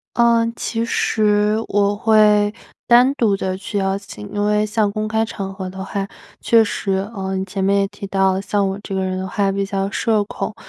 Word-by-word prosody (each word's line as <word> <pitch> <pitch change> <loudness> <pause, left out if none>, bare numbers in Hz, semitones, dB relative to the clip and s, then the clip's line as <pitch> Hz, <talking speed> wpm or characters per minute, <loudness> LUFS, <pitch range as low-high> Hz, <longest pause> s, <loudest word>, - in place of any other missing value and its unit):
呃， 235 -1 +3
其 230 0 -2
实 210 -2 +1
我 205 0 +2
会 210 -1 +4 0.3
单 245 +3 +6
独 215 -6 +2
的 190 -1 -3
去 200 +2 -5
邀 195 0 0
请， 105 - -10
因 205 0 -1
为 210 0 +2
像 215 -1 0
公 215 +1 -3
开 220 +1 +1
场 195 -3 -6
合 190 -1 -6
的 190 +1 -7
话 195 0 -3 0.3
确 230 -1 +4
实 200 -2 -2 0.2
呃， 190 0 -3
你 190 - -1
前 195 0 -5
面 200 +1 +2
也 195 - +1
提 200 0 -9
到， 190 -1 +1
像 200 0 0
我 195 +1 -4
这 195 - -7
个 190 - 0
人 185 0 -2
的 190 0 -4
话 200 0 0
比 195 0 -1
较 195 -1 -2
社 215 +1 +1
恐， 210 - -5
200 Hz, 225 characters per minute, -19 LUFS, 195-215 Hz, 0.3 s, 单